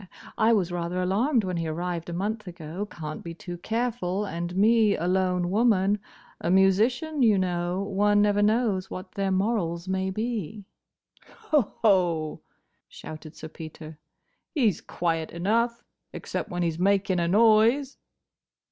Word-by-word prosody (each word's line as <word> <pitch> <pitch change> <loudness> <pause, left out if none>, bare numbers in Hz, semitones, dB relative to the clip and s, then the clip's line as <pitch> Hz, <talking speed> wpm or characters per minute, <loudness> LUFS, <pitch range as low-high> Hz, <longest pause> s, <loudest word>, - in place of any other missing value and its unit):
I 220 +1 +3
was 190 -6 +2
rather 175 +1 -2
alarmed 220 +8 +1
when 185 -2 -2
he 165 -1 -2
arrived 170 +1 -3
a - - -4
month 210 +4 -3
ago. 175 +3 -6
Can't 155 -5 -7
be 170 -1 -7
too 175 0 -8
careful, 220 -3 -2
and 175 -1 -4
me 215 +1 +4
a 170 - -3
lone 180 -1 +1
woman. 205 -2 +3 0.4
A 170 - -2
musician, 225 - +2
you 220 -5 +5
know. 180 0 -1
One 205 +1 +2
never 205 0 +3
knows 210 -3 +1
what 185 0 -7
their 195 -1 -1
morals 190 -3 -1
may 190 0 -1
be." 215 -1 -4 0.9
"Hoho!" 185 - +2 0.5
shouted 155 0 -10
Sir 155 - -8
Peter, 155 -1 -10 0.6
"he's 230 - +2
quiet 165 -2 -2
enough—except 230 +5 -3
when 175 -2 -2
he 170 - +1
's 160 - -9
making 195 -1 +2
a 170 - +1
noise!" 225 +7 +4
190 Hz, 140 wpm, -26 LUFS, 175-215 Hz, 0.9 s, you